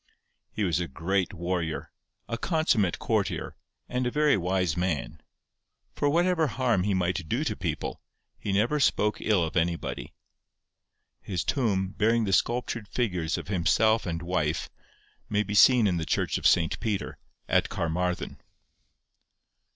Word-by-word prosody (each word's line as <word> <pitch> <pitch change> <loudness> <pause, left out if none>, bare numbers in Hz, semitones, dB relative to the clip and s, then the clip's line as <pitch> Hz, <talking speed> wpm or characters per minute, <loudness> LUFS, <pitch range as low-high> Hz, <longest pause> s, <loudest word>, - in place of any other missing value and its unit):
He 110 - -2
was 85 -3 +1
a 90 - -2
great 90 +7 -1
warrior, 85 -2 -3 0.4
a 115 - -2
consummate 130 - +1
courtier, - - -1 0.3
and 125 0 -1
a - - +2
very 150 +2 +3
wise 90 -1 0
man; 80 -4 -2 0.7
for 145 - +1
whatever 170 +1 +2
harm 120 -6 +1
he 100 -2 +1
might 90 -2 -1
do - - 0
to - - -2
people, - - -4 0.4
he 100 - -3
never 115 +10 +2
spoke 105 -6 +2
ill 105 -5 +2
of 80 +1 -4
anybody. 85 -7 -2 1.1
His 90 -5 -3
tomb, 100 -8 0
bearing 115 +3 +2
the 95 -3 -1
sculptured 120 -1 0
figures 90 -9 -1
of - - -7
himself 110 +4 +2
and 85 -1 -3
wife, 85 -3 -1 0.6
may 105 0 +1
be 105 - -5
seen 120 +2 +6
in 90 -4 +2
the 80 - -2
church - - 0
of - - +3
St. - - +2
Peter, 105 -3 -3 0.3
at - - +2
Carmarthen. 90 +2 -2
95 Hz, 145 wpm, -27 LUFS, 85-115 Hz, 1.1 s, seen